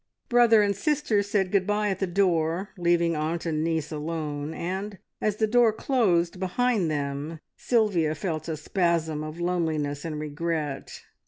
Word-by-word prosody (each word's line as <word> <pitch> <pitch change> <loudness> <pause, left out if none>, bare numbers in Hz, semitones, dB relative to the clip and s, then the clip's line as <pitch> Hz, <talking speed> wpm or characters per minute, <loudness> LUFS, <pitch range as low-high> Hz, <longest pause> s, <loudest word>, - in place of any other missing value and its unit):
Brother 235 -3 +6
and 200 -1 +1
sister 295 - +1
said 200 -2 0
good 195 -2 +2
bye 210 0 +1
at 190 -1 -2
the 195 - 0
door, 175 0 +1
leaving 170 -1 +2
aunt 160 +3 -2
and 155 -2 0
niece 160 -2 -1
alone, 150 -1 -3
and, 190 +5 -4 0.2
as 210 -1 +1
the 220 - +2
door 235 +1 +4
closed 190 -8 +1
behind 195 0 +1
them, 145 +2 -3 0.2
Sylvia 195 -10 +1
felt 155 -1 -3
a 160 -2 -3
spasm 160 -2 0
of 155 +2 -7
loneliness 160 -5 -1
and 155 -2 -4
regret. 150 -1 -4
170 Hz, 155 wpm, -26 LUFS, 155-205 Hz, 0.2 s, Brother